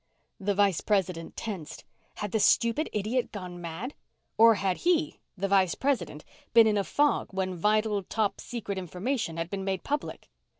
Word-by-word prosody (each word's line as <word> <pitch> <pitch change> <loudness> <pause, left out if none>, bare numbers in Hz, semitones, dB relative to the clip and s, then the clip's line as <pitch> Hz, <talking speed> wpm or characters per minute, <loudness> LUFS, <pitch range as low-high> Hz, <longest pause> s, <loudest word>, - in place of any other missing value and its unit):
The 200 0 0
Vice 200 -4 +3
President 185 -5 -1
tensed. 190 -9 -6 0.3
Had 205 -2 -4
the 220 - +1
stupid 235 +8 +3
idiot 215 +5 -1
gone 180 -3 -7
mad? 175 - -5 0.4
Or 230 0 +7
had 190 -2 0
he, 335 -3 +1 0.2
the 195 +2 -1
Vice 190 -3 +3
President, 200 - -1 0.3
been 230 -1 +9
in 215 -1 +3
a - - +1
fog 290 +8 +1
when 190 -1 -2
vital, 210 +3 +1
top 210 +2 -1
secret 205 -5 -4
information 180 - -3
had 165 +1 -3
been 195 -1 -3
made 190 -1 -2
public? 290 +1 -4
200 Hz, 165 wpm, -28 LUFS, 185-230 Hz, 0.4 s, been